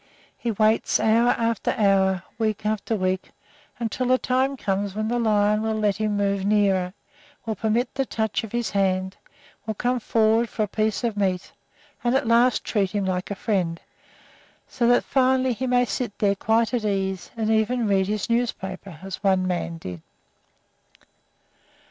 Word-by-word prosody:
He 240 Hz, -, -4 dB
waits 215 Hz, 0 st, +2 dB
hour 225 Hz, +2 st, +3 dB
after 230 Hz, -1 st, 0 dB
hour, 190 Hz, -3 st, +3 dB, 0.2 s
week 215 Hz, -1 st, -1 dB
after 215 Hz, +1 st, -1 dB
week, 185 Hz, -1 st, -1 dB, 0.5 s
until 245 Hz, +2 st, -1 dB
a 255 Hz, -, +5 dB
time 260 Hz, +2 st, 0 dB
comes 200 Hz, -2 st, -2 dB
when 215 Hz, +1 st, -1 dB
the 240 Hz, +1 st, 0 dB
lion 210 Hz, -2 st, +2 dB
will 220 Hz, 0 st, -1 dB
let 210 Hz, -2 st, +1 dB
him 215 Hz, -1 st, -1 dB
move 200 Hz, -1 st, 0 dB
nearer, 195 Hz, -2 st, +2 dB, 0.5 s
will 225 Hz, -, -1 dB
permit 225 Hz, +4 st, -1 dB
the 270 Hz, -1 st, -1 dB
touch 220 Hz, -1 st, -1 dB
of 220 Hz, -, -7 dB
his 240 Hz, -1 st, -2 dB
hand, 190 Hz, -1 st, 0 dB, 0.5 s
will 220 Hz, -, -2 dB
come 245 Hz, +3 st, 0 dB
forward 225 Hz, +1 st, +2 dB
for 215 Hz, -, -1 dB
a -, -, -1 dB
piece 215 Hz, +2 st, -1 dB
of 230 Hz, -3 st, -1 dB
meat, 190 Hz, -3 st, -1 dB, 0.5 s
and 240 Hz, +1 st, +2 dB
at 270 Hz, -1 st, +1 dB
last 235 Hz, +1 st, +3 dB
treat 200 Hz, -4 st, 0 dB
him 200 Hz, 0 st, -2 dB
like 185 Hz, 0 st, -2 dB
a 200 Hz, -, -3 dB
friend, 180 Hz, -7 st, -1 dB, 0.9 s
so 240 Hz, -2 st, 0 dB
that 245 Hz, 0 st, +4 dB
finally 260 Hz, -1 st, +2 dB
he 255 Hz, +3 st, -3 dB
may 245 Hz, 0 st, +3 dB
sit 240 Hz, -3 st, -4 dB
there 200 Hz, -1 st, +2 dB
quite 225 Hz, +4 st, +1 dB
at 240 Hz, -3 st, 0 dB
ease, 190 Hz, -3 st, -2 dB
and 220 Hz, -1 st, 0 dB
even 220 Hz, +2 st, +1 dB
read 195 Hz, -2 st, +2 dB
his 210 Hz, -1 st, -2 dB
newspaper, 195 Hz, -7 st, -2 dB
as 195 Hz, +1 st, -7 dB
one 190 Hz, -2 st, +3 dB
man 175 Hz, -2 st, -2 dB
did. 90 Hz, -, -8 dB
215 Hz, 170 wpm, -24 LUFS, 195-235 Hz, 0.9 s, a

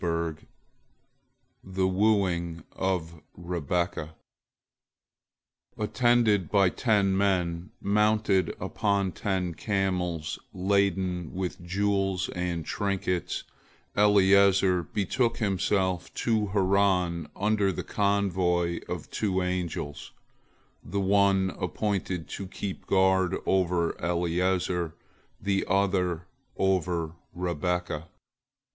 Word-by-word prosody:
THE 95 Hz, 0 st, 0 dB
WOOING 90 Hz, -4 st, +1 dB
OF 85 Hz, -4 st, -2 dB, 0.2 s
REBEKAH 85 Hz, -1 st, -2 dB, 1.6 s
Attended 110 Hz, -3 st, +2 dB
by 100 Hz, -3 st, +4 dB
ten 100 Hz, -3 st, +2 dB
men, 90 Hz, -2 st, 0 dB
mounted 105 Hz, -3 st, +2 dB
upon 100 Hz, -2 st, 0 dB
ten 90 Hz, 0 st, -2 dB
camels 90 Hz, -4 st, -1 dB, 0.2 s
laden 95 Hz, -3 st, 0 dB
with 90 Hz, -1 st, -3 dB
jewels 95 Hz, 0 st, 0 dB
and 90 Hz, -3 st, -3 dB
trinkets, 95 Hz, -4 st, -2 dB, 0.5 s
Eliezer 100 Hz, -2 st, +5 dB
betook 110 Hz, -, -1 dB
himself 95 Hz, -3 st, 0 dB
to 110 Hz, -3 st, +1 dB
Haran 95 Hz, -4 st, +2 dB
under 100 Hz, -1 st, +1 dB
the -, -, -4 dB
convoy 90 Hz, -4 st, +1 dB
of -, -, -4 dB
two 95 Hz, -3 st, 0 dB
angels, 90 Hz, -5 st, -4 dB, 0.7 s
the 100 Hz, -, -3 dB
one 95 Hz, -1 st, +3 dB
appointed 95 Hz, -6 st, -2 dB
to 100 Hz, -, -5 dB
keep 95 Hz, 0 st, -6 dB
guard 95 Hz, -2 st, +3 dB
over 90 Hz, -3 st, +1 dB
Eliezer, 90 Hz, 0 st, 0 dB, 0.4 s
the 100 Hz, -1 st, 0 dB
other 90 Hz, -3 st, +1 dB, 0.3 s
over 90 Hz, -4 st, +1 dB, 0.2 s
Rebekah. 90 Hz, -2 st, -2 dB
95 Hz, 85 wpm, -27 LUFS, 90-100 Hz, 1.6 s, Eliezer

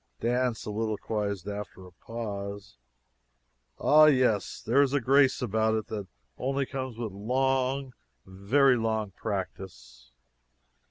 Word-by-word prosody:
Dan 125 Hz, 0 st, +1 dB
soliloquized 105 Hz, -2 st, -3 dB
after 100 Hz, -2 st, -6 dB
a 90 Hz, -, -14 dB
pause: 100 Hz, -, -7 dB, 1.0 s
"Ah, 155 Hz, +1 st, +6 dB
yes; 125 Hz, -9 st, +2 dB
there 130 Hz, +5 st, +3 dB
is 140 Hz, -1 st, +2 dB
a 145 Hz, -, +3 dB
grace 135 Hz, +1 st, +3 dB
about 110 Hz, -1 st, +1 dB
it 110 Hz, -, -2 dB
that 105 Hz, -3 st, -5 dB, 0.3 s
only 135 Hz, +1 st, -1 dB
comes 130 Hz, -3 st, -5 dB
with 115 Hz, -3 st, -4 dB
long, 130 Hz, +5 st, 0 dB, 0.3 s
very 125 Hz, +8 st, +3 dB
long 110 Hz, -2 st, -1 dB
practice." 95 Hz, -, -6 dB
110 Hz, 115 wpm, -28 LUFS, 100-130 Hz, 1.0 s, Ah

